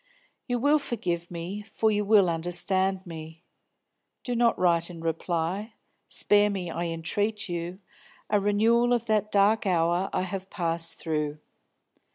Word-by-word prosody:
"You 245 -1 0
will 290 +5 +3
forgive 175 -10 -3
me, 175 +4 -5
for 220 +1 0
you 210 0 +1
will 205 -2 +5
understand 185 +3 -1
me. 160 0 -9 0.8
Do 245 - -2
not 235 0 +3
write 170 -1 +2
in 170 -2 -9
reply; 170 +6 -2 0.3
spare 205 0 +3
me, 185 -4 -3
I 170 +2 -3
entreat 205 +6 -1
you, 175 0 -4 0.5
a 210 - +2
renewal 225 +4 +3
of 235 -1 0
that 215 -1 +1
dark 205 +2 +3
hour 175 +1 +1
I - - 0
have 190 +1 -5
passed 165 -2 -1
through. 150 -2 -2
190 Hz, 145 wpm, -27 LUFS, 170-210 Hz, 0.8 s, will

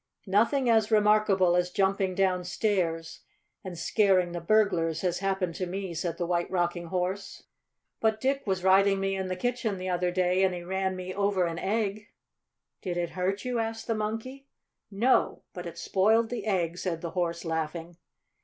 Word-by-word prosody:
"Nothing 230 +7 +2
as 220 -2 +3
remarkable 210 -4 +4
as 180 0 +1
jumping 190 0 0
downstairs 180 -2 0 0.4
and 185 -2 -7
scaring 185 0 +2
the 175 0 -5
burglars 170 -5 +2
has 180 -2 -1
happened 190 -3 -1
to 185 +2 -3
me," 190 0 -4
said 165 0 -3
the 175 - -1
White 175 0 -1
Rocking 175 -1 -1
Horse. 185 +3 -3 0.6
"But 220 -1 +1
Dick 275 +3 0
was 190 -2 -1
riding 195 +1 +4
me 195 0 -1
in 190 -1 -3
the 185 - -2
kitchen 235 0 -2
the 185 0 -4
other 180 0 0
day 180 +1 +1
and 185 -1 +2
he 175 - -6
ran 190 +1 -1
me 185 0 -6
over 200 -2 +1
an 165 -1 -3
egg." 210 0 -2 0.7
"Did 180 -2 -3
it 175 -1 -2
hurt 190 +5 -2
you?" 250 -2 -1
asked 225 0 -3
the 230 - 0
Monkey. 225 +6 -4 0.4
"No; 225 +6 +1
but 180 -1 -6
it 170 - -9
spoiled 220 +6 +2
the 230 -3 -4
egg," 175 -4 0
said 165 -3 -3
the 170 - -5
Horse, 170 -1 -2
laughing. 165 +1 -3
190 Hz, 175 wpm, -28 LUFS, 175-210 Hz, 0.7 s, remarkable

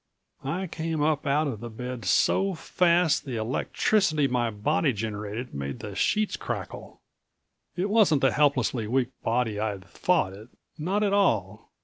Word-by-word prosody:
I 170 +8 -2
came 160 -3 -2
up 150 -1 0
out 145 +3 +2
of 130 -8 -3
the 120 +1 -7
bed 125 0 -6
so 190 - +2
fast 170 -1 +2
the 130 -4 -5
electricity 150 - +1
my 120 -2 0
body 135 +7 +1
generated 105 +2 -5
made 70 0 -4
the 105 - -6
sheets 215 - +1
crackle. - - -6 0.8
It 185 +2 0
wasn't 205 -9 +4
the 135 - +4
helplessly 130 -6 +1
weak 125 +1 +1
body 115 -2 0
I'd 105 -3 -3
thought 155 - 0
it. 105 +4 -12 0.3
Not 185 +7 -1
at 200 -1 +1
all. 110 - +1
135 Hz, 150 wpm, -26 LUFS, 110-165 Hz, 0.8 s, wasn't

